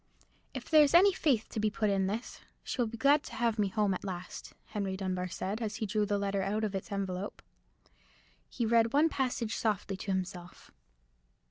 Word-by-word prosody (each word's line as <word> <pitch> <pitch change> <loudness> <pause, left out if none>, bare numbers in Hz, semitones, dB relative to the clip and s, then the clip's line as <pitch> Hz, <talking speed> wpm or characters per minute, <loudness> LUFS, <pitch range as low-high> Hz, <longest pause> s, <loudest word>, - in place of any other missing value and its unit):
"If - - -6
there's 305 -1 +6
any 385 +3 +7
faith 265 - +1
to 220 - -4
be 215 0 +2
put 210 0 0
in 195 -1 +1
this, 215 +5 -5 0.2
she 255 - -2
will 235 - +2
be 230 +1 -7
glad 280 +5 +4
to - - -8
have 230 -2 0
me 205 - +3
home 205 0 +1
at 185 - -5
last," 185 -2 -7
Henry 200 -3 -3
Dunbar 185 -1 -2
said, 190 +5 -4
as 215 -2 -2
he 220 - -2
drew 210 +1 0
the 205 - +1
letter 200 -1 -1
out 205 +3 -1
of 210 -2 -1
its 195 +2 -5
envelope. 195 0 -4 1.1
He 240 - -2
read 230 0 +3
one 305 +3 +5
passage 245 -6 -1
softly 205 -3 -1
to 195 - -4
himself. 180 -1 -5
210 Hz, 200 wpm, -31 LUFS, 195-230 Hz, 1.1 s, any